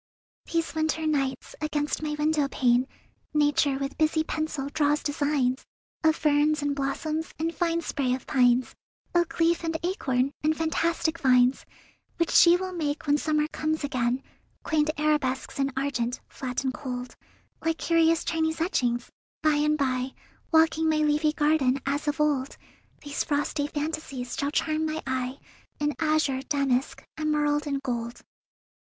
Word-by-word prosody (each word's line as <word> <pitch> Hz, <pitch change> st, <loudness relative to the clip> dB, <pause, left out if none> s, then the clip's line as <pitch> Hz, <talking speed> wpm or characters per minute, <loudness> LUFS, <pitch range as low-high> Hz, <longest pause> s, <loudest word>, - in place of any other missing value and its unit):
These 330 Hz, -1 st, 0 dB
winter 315 Hz, 0 st, 0 dB
nights, 275 Hz, -4 st, -1 dB
against 300 Hz, -1 st, -1 dB
my 305 Hz, -1 st, -2 dB
window 300 Hz, -1 st, +1 dB
pane 250 Hz, -1 st, +2 dB, 0.5 s
Nature 290 Hz, -2 st, +3 dB
with 275 Hz, +2 st, -4 dB
busy 315 Hz, 0 st, +2 dB
pencil 310 Hz, -3 st, -3 dB
draws 295 Hz, 0 st, +1 dB
designs 285 Hz, -3 st, 0 dB, 0.4 s
Of 315 Hz, 0 st, +4 dB
ferns 300 Hz, 0 st, +2 dB
and 285 Hz, -1 st, 0 dB
blossoms 305 Hz, +3 st, -2 dB
and 330 Hz, +1 st, -1 dB
fine 335 Hz, -1 st, 0 dB
spray 265 Hz, -6 st, 0 dB
of 260 Hz, -, -9 dB
pines, 250 Hz, -2 st, +3 dB, 0.4 s
Oak 345 Hz, -1 st, +1 dB
leaf 335 Hz, +1 st, +3 dB
and 325 Hz, -1 st, -1 dB
acorn 275 Hz, -8 st, 0 dB
and 310 Hz, 0 st, +2 dB
fantastic 330 Hz, 0 st, 0 dB
vines, 250 Hz, -2 st, +3 dB, 0.5 s
Which 335 Hz, -1 st, +1 dB
she 345 Hz, 0 st, +7 dB
will 370 Hz, 0 st, -4 dB
make 305 Hz, -3 st, -2 dB
when 290 Hz, 0 st, +3 dB
summer 305 Hz, -1 st, +1 dB
comes 310 Hz, 0 st, -2 dB
again— 255 Hz, -1 st, 0 dB, 0.4 s
Quaint 310 Hz, -1 st, +1 dB
arabesques 295 Hz, -4 st, 0 dB
in 275 Hz, 0 st, +1 dB
argent, 250 Hz, -3 st, -1 dB
flat 255 Hz, 0 st, -4 dB
and 260 Hz, -1 st, -1 dB
cold, 250 Hz, -2 st, -6 dB, 0.5 s
Like 325 Hz, 0 st, 0 dB
curious 330 Hz, -1 st, +2 dB
Chinese 320 Hz, 0 st, 0 dB
etchings.... 245 Hz, -8 st, 0 dB, 0.3 s
By 305 Hz, -1 st, +4 dB
and 300 Hz, +1 st, +2 dB
by, 260 Hz, -2 st, -1 dB, 0.4 s
Walking 320 Hz, 0 st, +4 dB
my 310 Hz, -, +2 dB
leafy 300 Hz, 0 st, +2 dB
garden 295 Hz, -4 st, +2 dB
as 285 Hz, +2 st, -1 dB
of 295 Hz, +1 st, -1 dB
old, 285 Hz, -3 st, 0 dB, 0.5 s
These 290 Hz, 0 st, -2 dB
frosty 290 Hz, 0 st, -1 dB
fantasies 290 Hz, -4 st, -4 dB
shall 280 Hz, -, -1 dB
charm 310 Hz, +1 st, 0 dB
my 310 Hz, 0 st, -3 dB
eye 260 Hz, 0 st, -2 dB, 0.4 s
In 295 Hz, 0 st, 0 dB
azure, 310 Hz, -4 st, +1 dB
damask, 275 Hz, -2 st, 0 dB, 0.2 s
emerald, 295 Hz, -1 st, +1 dB
and 280 Hz, -1 st, -1 dB
gold. 235 Hz, -2 st, -4 dB
295 Hz, 150 wpm, -27 LUFS, 270-315 Hz, 0.5 s, she